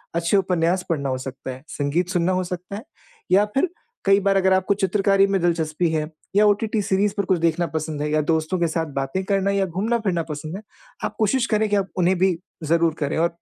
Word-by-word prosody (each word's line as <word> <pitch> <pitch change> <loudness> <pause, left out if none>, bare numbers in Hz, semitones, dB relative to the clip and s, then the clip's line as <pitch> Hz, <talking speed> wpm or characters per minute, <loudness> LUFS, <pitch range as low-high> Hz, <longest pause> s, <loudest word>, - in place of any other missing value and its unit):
अच्छे 170 +4 +2
उपन्यास 180 -1 +1
पढ़ना 140 -5 -1
हो 130 - -1
सकता 130 0 -7
है, 130 +1 -10
संगीत 155 +5 -1
सुनना 180 -1 +1
हो 185 0 0
सकता 180 +2 -6
है 215 - -7 0.5
या 200 +3 +5
फिर 310 +7 +2 0.4
कई 195 0 +5
बार 200 0 +1
अगर 190 0 +3
आपको 190 +1 +2
चित्रकारी 195 0 +2
में 195 -1 +1
दिलचस्पी 165 -1 0
है 155 -1 -1 0.3
या 210 +1 +6
ओटीटी 210 +1 +2
सीरीज़ 200 +1 +1
पर 200 - 0
कुछ 185 -2 +1
देखना 165 +1 +1
पसंद 155 -1 -3
है 150 - -1
या 155 - +2
दोस्तों 160 +3 0
के 170 - +2
साथ 160 0 -1
बातें 135 +8 -2
करना 195 0 +1
या 200 -1 +1
घूमना-फिरना 190 -1 -1
पसंद 155 +3 -5
है। 200 - -6 0.4
आप - - -4
कोशिश 235 +3 +2
करें 215 0 +1
कि 205 - +2
आप 195 -1 -1
उन्हें 180 +1 +2
भी 190 0 +3 0.3
ज़रूर 165 +1 +2
करें 145 +1 -1
और 165 +1 +3
180 Hz, 220 wpm, -22 LUFS, 160-195 Hz, 0.5 s, या